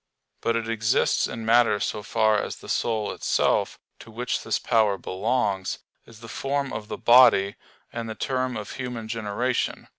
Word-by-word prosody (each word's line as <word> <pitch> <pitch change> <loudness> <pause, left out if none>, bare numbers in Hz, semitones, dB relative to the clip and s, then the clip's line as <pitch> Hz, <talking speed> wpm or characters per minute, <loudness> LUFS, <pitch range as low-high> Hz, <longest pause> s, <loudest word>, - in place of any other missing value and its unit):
But 115 - 0
it 115 -1 -2
exists 110 -1 +1
in 115 0 -6
matter 115 -2 +4
so 105 - -2
far 110 0 +2
as - - -5
the - - -14
soul 110 -3 -1
itself, - - 0 0.2
to - - -13
which 120 +2 -3
this 110 - -1
power 110 -4 +2
belongs, 100 0 -1 0.3
is 115 -1 -15
the 115 - -10
form 140 +2 -2
of 105 -1 -5
the - - -5
body, 120 -5 +6 0.4
and 115 -1 -5
the 110 - -5
term 130 0 -2
of 105 -2 -7
human 125 -4 -5
generation. 115 +3 -2
115 Hz, 170 wpm, -25 LUFS, 105-120 Hz, 0.4 s, body